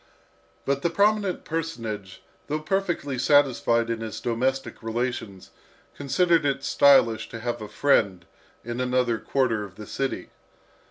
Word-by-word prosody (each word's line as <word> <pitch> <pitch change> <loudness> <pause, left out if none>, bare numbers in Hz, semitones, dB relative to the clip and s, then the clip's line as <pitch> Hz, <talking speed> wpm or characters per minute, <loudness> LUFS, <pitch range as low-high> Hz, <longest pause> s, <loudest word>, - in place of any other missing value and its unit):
But 140 0 0
the 170 - +1
prominent 200 +1 +1
personage, 115 - -5 0.2
though 150 - -1
perfectly 165 -6 -1
satisfied 125 -4 +3
in 115 - -2
his 110 -1 -5
domestic 130 +3 -2
relations, 115 -4 -4 0.4
considered 170 +4 +2
it 140 -1 -1
stylish 115 -7 +4
to 115 - -7
have 120 0 -3
a 105 - -6
friend 100 -7 +1 0.4
in 120 +1 -3
another 125 -2 +1
quarter 125 -6 0
of 95 -2 -10
the 105 +1 -9
city. 135 +5 -4
125 Hz, 130 wpm, -25 LUFS, 115-145 Hz, 0.4 s, stylish